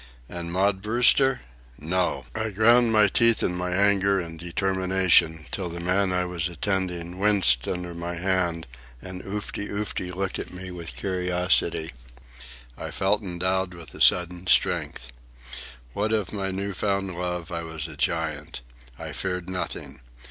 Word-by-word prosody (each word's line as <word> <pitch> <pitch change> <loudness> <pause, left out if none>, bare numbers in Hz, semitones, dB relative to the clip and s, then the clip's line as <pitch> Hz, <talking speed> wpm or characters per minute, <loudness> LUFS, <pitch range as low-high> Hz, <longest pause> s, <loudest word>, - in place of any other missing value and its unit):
And 85 +1 -5
Maud 95 +1 +1
Brewster? 120 +5 +4 0.4
No! 80 -4 -1
I 110 0 -2
ground 115 +3 +4
my 105 -1 +6
teeth 115 +3 +3
in 90 - 0
my 90 0 -2
anger 100 +1 +3
and 85 -2 -6
determination 90 -2 +2
till 95 -3 -3
the 85 +1 -6
man 95 +2 +1
I 90 0 +1
was 90 -2 -2
attending 90 -1 -3
winced 95 -12 +3
under 90 -1 -3
my 85 +1 -5
hand 85 -2 0 0.3
and 90 +5 -8
Oofty 100 +1 -5
Oofty 100 -3 -3
looked 95 +1 -3
at - - -5
me 90 0 -8
with 85 -2 -8
curiosity. 90 -3 0 0.8
I - - -6
felt 105 +3 +1
endowed 95 0 -1
with 85 -2 -10
a - - -9
sudden 90 0 +3
strength. 65 -7 +1 0.8
What 105 +6 -1
of 105 -4 0
my 100 -2 -2
new 100 +1 -3
found 100 0 -1
love, 90 -1 -4
I 85 -1 -3
was 80 -2 -5
a - - -7
giant. 75 -5 -2 0.4
I - - -7
feared 90 -1 -3
nothing. 90 -7 -5
90 Hz, 150 wpm, -25 LUFS, 85-100 Hz, 0.8 s, my